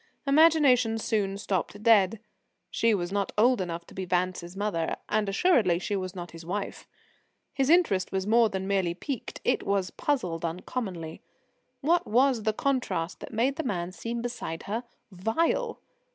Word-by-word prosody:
Imagination 275 Hz, -6 st, +5 dB
soon 205 Hz, -3 st, -1 dB
stopped 200 Hz, +1 st, -3 dB
dead. 215 Hz, -2 st, +5 dB, 0.5 s
She 230 Hz, -1 st, +2 dB
was 175 Hz, -2 st, -3 dB
not 200 Hz, 0 st, -1 dB
old 240 Hz, 0 st, +4 dB
enough 170 Hz, -1 st, -4 dB
to -, -, -15 dB
be 190 Hz, -, -4 dB
Vance's 180 Hz, 0 st, -2 dB
mother, 190 Hz, -6 st, -1 dB
and 210 Hz, -1 st, +1 dB
assuredly 200 Hz, -, +3 dB
she 195 Hz, +3 st, -2 dB
was 185 Hz, -1 st, -4 dB
not 175 Hz, -1 st, -7 dB
his 165 Hz, 0 st, -10 dB
wife. 195 Hz, +4 st, -4 dB, 0.7 s
His 270 Hz, 0 st, +1 dB
interest 320 Hz, -, +3 dB
was 190 Hz, -1 st, -1 dB
more 225 Hz, +1 st, +4 dB
than 190 Hz, -1 st, -4 dB
merely 190 Hz, -4 st, +1 dB
piqued 265 Hz, -, -5 dB
it -, -, +1 dB
was 195 Hz, -2 st, -1 dB
puzzled 180 Hz, -, -1 dB
uncommonly. 170 Hz, -1 st, -4 dB, 0.6 s
What 335 Hz, +5 st, +2 dB
was 250 Hz, +1 st, +3 dB
the 215 Hz, +1 st, +1 dB
contrast 245 Hz, -10 st, -1 dB
that -, -, -9 dB
made 250 Hz, +5 st, +1 dB
the 320 Hz, -, -2 dB
man 180 Hz, -, -2 dB
seem 230 Hz, +6 st, -5 dB
beside 235 Hz, -9 st, -5 dB
her 225 Hz, +5 st, -3 dB, 0.3 s
vile? 330 Hz, -, 0 dB
205 Hz, 160 wpm, -28 LUFS, 185-245 Hz, 0.7 s, Imagination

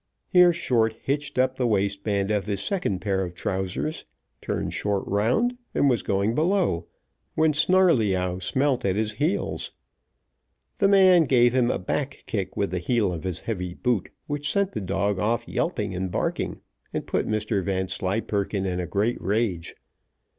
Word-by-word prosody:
Here 180 Hz, -1 st, +6 dB
Short 120 Hz, -10 st, +1 dB
hitched 140 Hz, -1 st, -2 dB
up 130 Hz, 0 st, +2 dB
the 125 Hz, -, +1 dB
waistband 100 Hz, -1 st, 0 dB
of 105 Hz, -1 st, 0 dB
his 100 Hz, -2 st, -1 dB
second 175 Hz, -, -1 dB
pair 95 Hz, -2 st, 0 dB
of 90 Hz, -1 st, -6 dB
trousers, 95 Hz, -, -2 dB, 0.4 s
turned -, -, -3 dB
short 100 Hz, -1 st, -1 dB
round, 120 Hz, -, +1 dB, 0.2 s
and 140 Hz, -, +4 dB
was 120 Hz, -5 st, +1 dB
going 100 Hz, +3 st, 0 dB
below, 160 Hz, -, +1 dB, 0.5 s
when 155 Hz, -1 st, +3 dB
Snarleyyow 120 Hz, -, +3 dB
smelt 130 Hz, +7 st, 0 dB
at 95 Hz, -1 st, +1 dB
his 110 Hz, +1 st, 0 dB
heels. 155 Hz, -, -1 dB, 1.1 s
The 200 Hz, -, +4 dB
man 185 Hz, -4 st, +6 dB
gave 120 Hz, -2 st, +4 dB
him 125 Hz, -2 st, +3 dB
a -, -, +1 dB
back 135 Hz, +9 st, -3 dB
kick 100 Hz, -4 st, -3 dB
with 100 Hz, -, 0 dB
the 90 Hz, -, -1 dB
heel 105 Hz, 0 st, +1 dB
of 80 Hz, -, -6 dB
his 90 Hz, -2 st, -2 dB
heavy 90 Hz, -5 st, -4 dB
boot, 120 Hz, -5 st, 0 dB, 0.2 s
which 145 Hz, -1 st, -1 dB
sent 200 Hz, -1 st, +1 dB
the 110 Hz, -, -4 dB
dog 100 Hz, +1 st, -1 dB
off 115 Hz, +4 st, 0 dB
yelping -, -, -2 dB
and 95 Hz, 0 st, -3 dB
barking, -, -, -2 dB, 0.3 s
and -, -, -3 dB
put -, -, -1 dB
Mr 110 Hz, -2 st, -1 dB
Vanslyperken 95 Hz, +2 st, -1 dB
in 90 Hz, -1 st, -2 dB
a 90 Hz, -, -3 dB
great 105 Hz, +4 st, 0 dB
rage. 100 Hz, -3 st, -1 dB
105 Hz, 160 wpm, -25 LUFS, 95-140 Hz, 1.1 s, Here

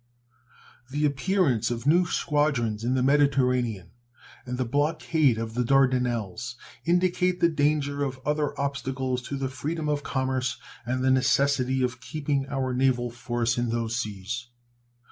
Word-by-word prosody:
The 145 Hz, +3 st, 0 dB
appearance 140 Hz, -, +1 dB
of 120 Hz, 0 st, -4 dB
new 175 Hz, +5 st, +4 dB
squadrons 135 Hz, -11 st, 0 dB
in 125 Hz, +2 st, +1 dB
the 130 Hz, -, +1 dB
Mediterranean 125 Hz, -9 st, +2 dB, 0.6 s
and 125 Hz, 0 st, -3 dB
the 130 Hz, -, 0 dB
blockade 145 Hz, 0 st, +1 dB
of 110 Hz, 0 st, -4 dB
the 125 Hz, +1 st, 0 dB
Dardanelles 125 Hz, -4 st, +1 dB, 0.3 s
indicate 180 Hz, +1 st, +2 dB
the 170 Hz, -, +5 dB
danger 145 Hz, -2 st, +1 dB
of 130 Hz, -2 st, -3 dB
other 150 Hz, 0 st, -1 dB
obstacles 135 Hz, -2 st, -2 dB
to 140 Hz, -, -3 dB
the 135 Hz, 0 st, -1 dB
freedom 150 Hz, +5 st, -4 dB
of 145 Hz, -1 st, 0 dB
commerce 130 Hz, -2 st, -1 dB, 0.3 s
and 130 Hz, +1 st, -1 dB
the 130 Hz, -, +4 dB
necessity 130 Hz, 0 st, +2 dB
of 125 Hz, 0 st, -2 dB
keeping 140 Hz, +1 st, -2 dB
our 135 Hz, -2 st, -1 dB
naval 125 Hz, -2 st, +1 dB
force 120 Hz, 0 st, -1 dB
in 120 Hz, -1 st, 0 dB
those 115 Hz, -1 st, -1 dB
seas. 110 Hz, +2 st, -4 dB
130 Hz, 145 wpm, -26 LUFS, 120-145 Hz, 0.6 s, the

